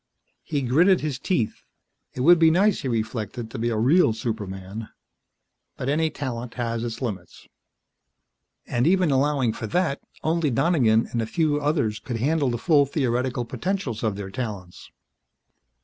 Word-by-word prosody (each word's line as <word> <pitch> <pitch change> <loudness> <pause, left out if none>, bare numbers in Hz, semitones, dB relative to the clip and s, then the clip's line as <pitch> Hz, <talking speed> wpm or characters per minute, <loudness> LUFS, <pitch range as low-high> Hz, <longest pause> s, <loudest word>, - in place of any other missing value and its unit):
He 145 -3 -2
gritted 170 +10 +4
his 145 -4 -3
teeth. 135 - -1 0.5
It 125 - -3
would 170 +5 +6
be 165 -1 +6
nice, 195 +5 +3
he - - -3
reflected, 115 0 -3
to 125 - -6
be 120 +1 0
a 115 - -1
real 130 +3 +4
superman. 105 -2 -5 0.9
But 130 - -3
any 160 +2 +2
talent 125 -5 -5
has 115 -1 -2
its 115 +1 -5
limits. 95 -7 -6 1.2
And, 125 +3 0
even 180 -3 +3
allowing 135 -3 +2
for 110 - -5
that, 170 - 0 0.2
only 160 -1 +1
Donegan 120 -4 +3
and 115 - -1
a - - -1
very 110 - -14
few 155 -3 +2
others 140 -8 0
could 115 +2 -5
handle 140 +3 +1
the 120 - -1
full 145 +1 +3
theoretical 125 -3 -1
potentials 175 - -3
of 110 -3 -1
their 100 -1 -6
talents. 100 -7 -6
125 Hz, 160 wpm, -24 LUFS, 115-155 Hz, 1.2 s, would